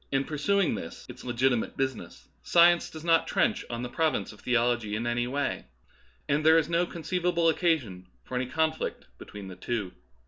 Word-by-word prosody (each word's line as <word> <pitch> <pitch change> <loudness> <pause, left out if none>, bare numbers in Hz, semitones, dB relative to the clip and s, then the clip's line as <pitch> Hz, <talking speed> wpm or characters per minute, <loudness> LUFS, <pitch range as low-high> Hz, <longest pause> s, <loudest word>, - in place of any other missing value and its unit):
pursuing 185 +5 +1
this 80 - -7
its - - -10
legitimate 125 -1 0
business, 135 -2 -4
science 175 0 +5
does 160 -1 -10
not 165 -1 +3
trench - - +1
on 120 0 -4
the - - -2
province 160 +5 -1
of 105 - -17
theology 120 -3 +1
in 115 +2 -3
any 120 0 0
way, 140 +2 -2 0.6
and 145 +2 +1
there 160 +1 +6
is 160 - +2
no 170 +1 +1
conceivable 170 0 0
occasion 130 - 0 0.2
for - - -12
any 125 0 -1
conflict 160 +3 -1
between 100 -2 -9
the 95 - -8
two. 100 -1 -3
135 Hz, 170 wpm, -28 LUFS, 120-165 Hz, 0.6 s, there